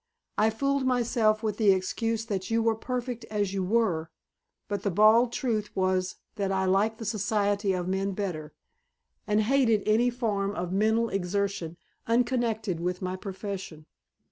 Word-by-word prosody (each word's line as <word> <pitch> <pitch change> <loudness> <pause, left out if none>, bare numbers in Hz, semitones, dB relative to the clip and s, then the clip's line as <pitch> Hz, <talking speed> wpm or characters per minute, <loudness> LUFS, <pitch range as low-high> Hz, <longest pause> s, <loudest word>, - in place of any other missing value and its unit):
I 215 +1 +3
fooled 275 +5 0
myself 235 -3 +2
with 215 -2 -1
the 215 -3 +3
excuse 225 +4 -1
that 195 -4 -3
you 230 0 +2
were 225 0 +3
perfect 245 +1 -4
as 205 -3 -2
you 195 -1 -1
were, 180 -6 +1 0.6
but 205 -2 -3
the 200 - 0
bald 215 +5 +5
truth 220 -5 -1
was 185 -1 0 0.2
that 195 -1 -1
I 190 0 +1
liked 200 +4 +2
the 225 - -7
society 205 -1 0
of 180 -1 -2
men 195 +1 -1
better, 175 -6 -4 0.8
and 210 0 +3
hated 230 -3 +3
any 225 +3 +4
form 205 -5 -1
of 180 -1 -3
mental 220 +3 +2
exertion 195 -3 -2 0.3
unconnected 230 -5 0
with 180 +2 -2
my 185 0 -2
profession. 190 -5 -6
210 Hz, 155 wpm, -28 LUFS, 190-225 Hz, 0.8 s, bald